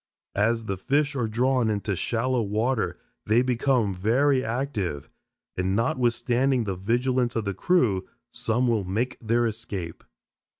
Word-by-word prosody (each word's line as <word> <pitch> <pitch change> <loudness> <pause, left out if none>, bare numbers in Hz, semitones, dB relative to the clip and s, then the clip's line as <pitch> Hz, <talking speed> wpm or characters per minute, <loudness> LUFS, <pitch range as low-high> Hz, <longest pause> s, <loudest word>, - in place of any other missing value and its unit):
As 115 +2 +2
the 100 -2 -3
fish 140 +8 0
are 120 -4 0
drawn 125 +1 +1
into 105 -1 -1
shallow 120 +6 0
water 110 +4 0 0.3
they 115 +4 +4
become 125 -4 +1
very 130 +8 +2
active, 110 - -3 0.4
and 95 +1 0
notwithstanding 120 +2 +1
the 100 -3 -3
vigilance 120 +5 0
of 115 -2 -1
the 100 - -1
crew, 105 - +1 0.3
some 120 +1 0
will 115 -4 +1
make 110 +8 -2
their 120 +1 +1
escape. 100 -7 -5
115 Hz, 135 wpm, -26 LUFS, 105-125 Hz, 0.4 s, they